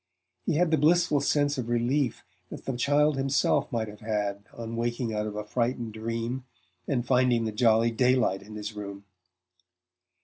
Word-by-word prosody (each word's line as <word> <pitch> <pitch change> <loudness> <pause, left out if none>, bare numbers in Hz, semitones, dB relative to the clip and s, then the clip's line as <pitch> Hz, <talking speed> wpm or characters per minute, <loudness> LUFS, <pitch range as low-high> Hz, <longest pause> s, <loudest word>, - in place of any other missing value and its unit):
He 170 - +2
had 170 +1 +2
the 160 - +3
blissful 155 -1 +3
sense 145 -1 +1
of 120 -2 -4
relief 120 +2 0 0.3
that - - -9
the 135 - -2
child 145 +3 +2
himself 135 0 +1
might 115 -2 -1
have 105 0 -10
had 105 -2 -2
on 115 0 -6
waking 120 0 -1
out 105 0 -1
of 105 - -6
a 105 - -3
frightened 115 0 -2
dream 115 +3 -3 0.4
and 125 -4 0
finding 125 -2 +3
the 110 - -1
jolly 115 +1 +3
daylight 125 -5 +2
in 105 +1 -11
his 105 +1 -5
room. 100 -1 -7
120 Hz, 170 wpm, -28 LUFS, 110-135 Hz, 0.4 s, the